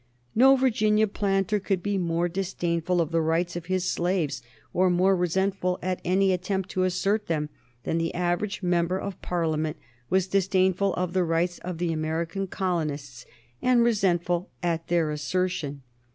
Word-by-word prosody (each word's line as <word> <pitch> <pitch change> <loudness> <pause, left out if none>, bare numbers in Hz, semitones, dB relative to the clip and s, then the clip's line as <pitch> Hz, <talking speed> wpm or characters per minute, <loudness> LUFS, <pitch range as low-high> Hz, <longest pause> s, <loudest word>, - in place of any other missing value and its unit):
No 265 +3 +7
Virginian 215 -5 +2
planter 195 0 0
could 195 -2 -1
be 205 -1 0
more 170 0 0
disdainful 175 -1 -1
of 165 -1 -2
the 165 0 +2
rights 165 +2 0
of 170 -1 -6
his 185 -1 0
slaves, 170 -8 0 0.3
or 185 +1 +3
more 185 +2 +3
resentful 185 +1 0
at 185 0 -2
any 190 +1 +3
attempt 190 +1 -2
to 185 0 0
assert 200 +4 0
them, 150 -2 -1 0.3
than 165 - -1
the 165 0 -2
average 180 +4 -1
member 175 0 +1
of 200 -1 -6
Parliament 160 -3 -1 0.3
was 190 0 +2
disdainful 190 0 +2
of 180 -1 -2
the 185 -1 +2
rights 170 +1 0
of 180 -1 -5
the 170 -1 -1
American 165 +5 -2
colonists 150 -9 -3 0.3
and 250 -2 +4
resentful 180 -5 +1
at 165 -1 -1
their 165 -3 +1
assertion. 150 -3 -2
180 Hz, 155 wpm, -26 LUFS, 165-195 Hz, 0.3 s, No